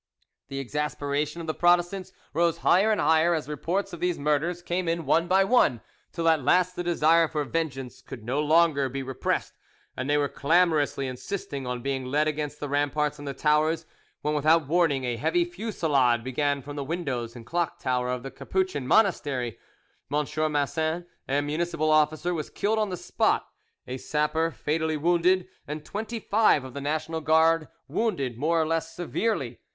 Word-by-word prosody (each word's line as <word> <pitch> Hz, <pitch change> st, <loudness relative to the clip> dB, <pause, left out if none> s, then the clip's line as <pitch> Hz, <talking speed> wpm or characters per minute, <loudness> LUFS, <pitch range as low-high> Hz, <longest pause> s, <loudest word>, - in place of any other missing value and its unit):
The 135 Hz, 0 st, -6 dB
exasperation 150 Hz, +3 st, -2 dB
of -, -, -6 dB
the 160 Hz, -, -2 dB
Protestants 175 Hz, +2 st, +2 dB, 0.2 s
rose 170 Hz, +1 st, +2 dB
higher 200 Hz, +5 st, +5 dB
and 215 Hz, -, +1 dB
higher 160 Hz, +2 st, +4 dB
as 155 Hz, -, -3 dB
reports 180 Hz, +6 st, -2 dB
of 175 Hz, -, -6 dB
these 180 Hz, 0 st, 0 dB
murders 150 Hz, +4 st, 0 dB
came 175 Hz, 0 st, -2 dB
in 165 Hz, -1 st, -1 dB
one 165 Hz, +5 st, +2 dB
by 190 Hz, +2 st, +4 dB
one, 195 Hz, -, +3 dB, 0.3 s
till 165 Hz, 0 st, -2 dB
at 160 Hz, -2 st, +4 dB
last 180 Hz, +5 st, +3 dB
the -, -, -3 dB
desire 165 Hz, -1 st, +4 dB
for 150 Hz, -1 st, -2 dB
vengeance 135 Hz, -3 st, -4 dB
could 115 Hz, -, -10 dB
no 125 Hz, +6 st, -1 dB
longer 150 Hz, -3 st, +3 dB
be 135 Hz, +1 st, -4 dB
repressed, 130 Hz, -1 st, -2 dB, 0.4 s
and 130 Hz, +2 st, -4 dB
they 145 Hz, -, +3 dB
were 145 Hz, -1 st, +2 dB
clamorously 155 Hz, -2 st, +2 dB
insisting 135 Hz, +1 st, -5 dB
on 125 Hz, -1 st, -4 dB
being 135 Hz, -1 st, -2 dB
led 150 Hz, +4 st, +1 dB
against 150 Hz, -1 st, -3 dB
the 145 Hz, -, -4 dB
ramparts 145 Hz, +1 st, 0 dB
and 145 Hz, -, -8 dB
the 140 Hz, -, -4 dB
towers, 155 Hz, +3 st, +2 dB, 0.4 s
when 150 Hz, -, 0 dB
without 155 Hz, +1 st, +3 dB
warning 160 Hz, -4 st, +2 dB
a 120 Hz, -2 st, -2 dB
heavy 165 Hz, +5 st, +1 dB
fusillade 160 Hz, -, +1 dB
began 140 Hz, +2 st, -1 dB
from 145 Hz, 0 st, -8 dB
the 145 Hz, -, -3 dB
windows 135 Hz, -7 st, -3 dB
and 120 Hz, -2 st, -10 dB
the -, -, -19 dB
clock 170 Hz, -1 st, 0 dB
tower 125 Hz, -1 st, -1 dB
of 125 Hz, -1 st, -3 dB
the 135 Hz, -, -6 dB
Capuchin 185 Hz, -8 st, -2 dB
monastery. 145 Hz, -, +1 dB, 0.5 s
M. 150 Hz, +1 st, +1 dB, 0.3 s
Massin, 160 Hz, +4 st, -1 dB, 0.2 s
a 140 Hz, +2 st, +2 dB
municipal 155 Hz, +1 st, -1 dB
officer, 155 Hz, +3 st, +2 dB
was 155 Hz, -3 st, -4 dB
killed 220 Hz, +2 st, 0 dB
on 215 Hz, -1 st, 0 dB
the 180 Hz, -, -4 dB
spot, -, -, +1 dB, 0.4 s
a 130 Hz, -, -5 dB
sapper 150 Hz, +4 st, 0 dB
fatally 160 Hz, 0 st, -1 dB
wounded, 175 Hz, +3 st, +2 dB, 0.2 s
and 150 Hz, +1 st, -6 dB
twenty 220 Hz, +3 st, -4 dB
five 210 Hz, -, +3 dB
of 130 Hz, -1 st, -9 dB
the 140 Hz, -, -5 dB
National 155 Hz, +3 st, -2 dB
Guard 160 Hz, 0 st, +3 dB, 0.2 s
wounded 140 Hz, -, -1 dB
more 160 Hz, +7 st, +1 dB
or 160 Hz, -, +2 dB
less 165 Hz, 0 st, -2 dB
severely. 175 Hz, -, -2 dB
155 Hz, 180 wpm, -26 LUFS, 140-170 Hz, 0.5 s, higher